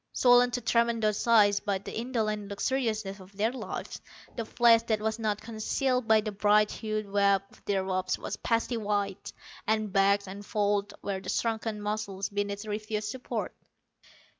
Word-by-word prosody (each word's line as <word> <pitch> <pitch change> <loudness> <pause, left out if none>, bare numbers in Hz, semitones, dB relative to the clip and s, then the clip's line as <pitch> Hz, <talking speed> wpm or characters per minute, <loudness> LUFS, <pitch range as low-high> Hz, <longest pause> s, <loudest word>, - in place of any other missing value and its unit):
Swollen 245 0 +5
to 245 0 -3
tremendous 230 -2 +1
size 210 -3 +5
by 200 -2 -1
the 190 - -8
indolent 220 -3 -2
luxuriousness 215 -2 -2
of 190 +1 -15
their 220 +3 +2
lives, 260 - -6 0.3
the 230 - -2
flesh 230 0 +5
that 220 -2 +1
was 220 +1 -2
not 210 -2 -1
concealed 230 +3 -1
by 220 -1 +5
the 215 0 -4
bright 210 +1 +3
hued 215 -1 -3
web 200 -1 +3
of - - -21
their 195 -2 0
robes 185 -1 -1
was - - -5
pasty 230 +1 0
white, 205 -2 -2 0.4
and 215 -2 0
bagged 200 0 +3
and 200 +2 -8
folded 205 -1 0
where 195 -1 -3
the - - -7
shrunken 225 -2 -1
muscles 205 -2 -3
beneath 205 +1 -3
refused 210 0 -3
support. 255 +3 -4
210 Hz, 165 wpm, -29 LUFS, 200-225 Hz, 0.4 s, Swollen